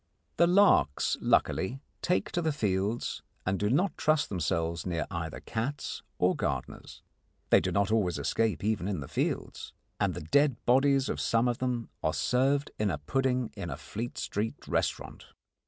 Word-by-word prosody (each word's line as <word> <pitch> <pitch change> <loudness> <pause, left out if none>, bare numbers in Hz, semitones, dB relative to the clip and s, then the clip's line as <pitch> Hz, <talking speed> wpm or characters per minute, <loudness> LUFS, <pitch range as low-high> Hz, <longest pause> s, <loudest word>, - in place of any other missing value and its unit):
The 170 - +5
larks 180 - +4
luckily 120 +8 +1 0.2
take 180 - 0
to 175 - 0
the 160 -1 +1
fields 105 -4 -1 0.2
and 95 +1 0
do 105 - +1
not 175 - +2
trust 155 -1 +2
themselves 85 -2 -1
near 85 -3 -2
either 85 -3 -4
cats 120 +6 -3 0.2
or - - +3
gardeners. - - -4 0.5
They - - +8
do 95 - -2
not 100 +3 +1
always 100 -6 +1
escape 110 -8 0
even 105 -3 0
in 100 -5 -2
the 70 - -6
fields, 75 - -3 0.3
and - - +1
the - - -5
dead 140 - +3
bodies 135 +2 +4
of - - -2
some 115 +2 +2
of 120 -1 -1
them 125 -2 -2
are 80 - 0
served 135 +3 +1
in 105 -1 +2
a 75 - -1
pudding 125 - 0
in 100 -5 -5
a 70 - -4
Fleet 110 +9 -6
Street 105 +2 -3
restaurant. - - -2
110 Hz, 170 wpm, -29 LUFS, 90-135 Hz, 0.5 s, They